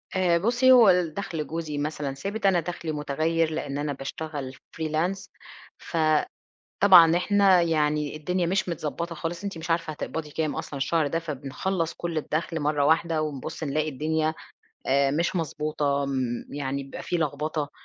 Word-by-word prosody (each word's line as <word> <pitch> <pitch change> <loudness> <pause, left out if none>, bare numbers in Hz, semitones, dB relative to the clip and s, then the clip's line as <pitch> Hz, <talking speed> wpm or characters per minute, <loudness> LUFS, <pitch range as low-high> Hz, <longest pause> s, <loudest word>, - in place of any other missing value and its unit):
آآ، 180 -2 +3
بُصي 240 +7 +3
هو 240 -6 +8
الدخل 170 -3 0
جوزي 160 -2 -4
مثلًا 145 -1 -2
ثابت 200 +10 -4
أنا 185 -3 +4
دخلي 170 -1 -4
متُغيّر، 155 +2 0
لإن 140 -2 -3
أنا 145 0 -2
باشتغل 140 -1 -6
Freelance 160 +7 -3 0.5
ف 170 - -6 0.9
طبعًا 175 -4 +8
إحنا 195 -1 +4
يعني 150 -3 +1
الدنيا 175 +3 -1
مش 185 +1 0
متضبطة 170 +1 -4
خالص، 170 +4 -4
أنتِ 200 -4 -4
مش 165 +1 -7
عارفة 165 -1 0
هتقبضي 150 0 -5
كام 155 -1 -2
أصلًا 140 - -5
الشهر 155 +3 +1
ده، 165 +3 -1
فبنخلص 165 +3 -3
كل 170 -2 -4
الدَخل 160 +2 -2
مرّة 145 -1 +1
واحدة، 160 +1 +2
ونبُص 150 0 -5
نلاقي 155 +1 0
الدنيا 155 +2 0 0.5
آآ، 140 +1 +3
مش 170 +6 0
مضبوطة 150 -3 -1
م 130 -3 -2
يعني 140 -1 -3
بيبقى 135 - -8
فيه 175 - -1
لخبطة، 155 -1 -2
160 Hz, 155 wpm, -26 LUFS, 145-170 Hz, 0.9 s, هو